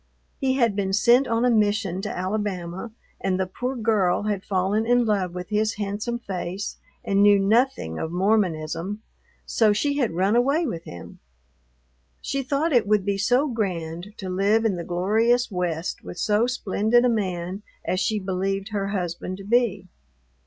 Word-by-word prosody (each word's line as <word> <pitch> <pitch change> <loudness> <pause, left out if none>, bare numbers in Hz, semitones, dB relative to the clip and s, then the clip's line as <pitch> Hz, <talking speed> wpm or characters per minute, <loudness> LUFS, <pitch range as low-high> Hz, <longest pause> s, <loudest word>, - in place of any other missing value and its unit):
He 265 -1 +1
had 235 -6 +2
been 195 -1 -1
sent 240 +6 +4
on 230 +1 +1
a 250 - +4
mission 205 -4 +1
to 210 - -4
Alabama, 190 0 -3 0.3
and 185 -1 -1
the 190 - +1
poor 245 +8 -4
girl 210 -6 +1
had 205 -2 -2
fallen 195 +3 0
in 245 +1 +3
love 190 -5 0
with 180 +2 -6
his 215 +1 0
handsome 205 +3 -3
face 195 -3 -5 0.3
and 200 0 +2
knew 205 0 +7
nothing 200 - +1
of 160 - -3
Mormonism, 185 0 0 0.4
so 215 -3 +3
she 285 +7 0
had 240 -5 +2
run 190 +5 +2
away 280 +8 +2
with 170 - -4
him. 85 -1 -10 1.0
She 275 - -2
thought 285 +4 0
it 235 -5 +3
would 210 -2 +2
be 200 -1 0
so 250 +8 +3
grand 185 - -3
to 190 - -6
live 200 +5 +2
in 210 -4 +2
the 170 - -4
glorious 220 +8 +1
West 175 -2 -3
with - - -8
so 210 +5 +2
splendid 240 0 +2
a - - +5
man 190 -4 -2 0.2
as 185 - 0
she 210 +3 0
believed 195 +1 -2
her 200 -2 -2
husband 185 -1 -3
to 195 - -10
be. 220 -3 +1
205 Hz, 170 wpm, -24 LUFS, 185-230 Hz, 1.0 s, knew